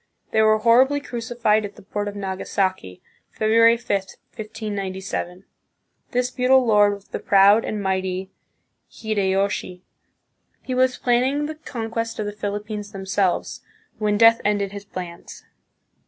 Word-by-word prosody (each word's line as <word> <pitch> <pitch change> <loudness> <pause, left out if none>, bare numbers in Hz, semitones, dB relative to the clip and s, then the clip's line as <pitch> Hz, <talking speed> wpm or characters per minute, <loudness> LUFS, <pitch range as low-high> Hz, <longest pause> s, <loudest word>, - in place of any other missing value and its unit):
They 220 - +3
were 215 0 +5
horribly 250 +6 +4
crucified 235 -5 -1
at 205 0 -7
the - - -15
port 205 +1 -4
of 205 - -5
Nagasaki, 190 - -3 0.3
February 230 +2 +4
5, 235 - -21 0.5
1597. 195 -4 -5 0.6
This 250 0 -1
feudal 255 0 +3
lord 205 -2 +4
was 200 0 -17
the - - -4
proud 200 +3 +5
and 210 -1 -4
mighty 190 0 -2 0.6
Hideyoshi. 195 -3 -2 0.8
He 255 - -4
was 255 0 +2
planning 260 +4 +1
the 310 - -4
conquest 230 -6 -5
of 215 - -3
the 205 - -3
Philippines 210 0 -5
themselves, 190 -1 -1 0.4
when 210 -1 +1
death 230 +1 +6
ended 205 -2 0
his 200 0 -8
plans. 180 -3 -9
210 Hz, 130 wpm, -22 LUFS, 195-230 Hz, 0.8 s, death